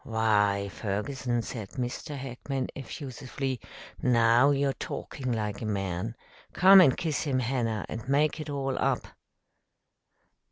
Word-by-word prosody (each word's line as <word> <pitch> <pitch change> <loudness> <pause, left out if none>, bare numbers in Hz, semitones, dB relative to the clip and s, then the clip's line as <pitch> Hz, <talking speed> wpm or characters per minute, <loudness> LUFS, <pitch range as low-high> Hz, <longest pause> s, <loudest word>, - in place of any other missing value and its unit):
"Why, 105 -3 +2
Ferguson," 115 +5 -2
said 110 -4 -7
Mr. 130 +3 -4
Hackman 135 0 -4
effusively, 135 -1 -5 0.4
"now 120 +2 +5
you're 140 -1 +2
talking 130 0 -5
like 105 -3 -2
a - - -3
man. 100 +1 -2 0.4
Come 190 +1 +8
and 140 -8 +5
kiss 160 -4 -1
him, 135 -3 +1
Hannah, 120 -4 -1
and 115 +3 -6
make 150 +3 +2
it 155 -1 -5
all 135 -2 -2
up." - - 0
125 Hz, 125 wpm, -28 LUFS, 110-140 Hz, 0.4 s, Come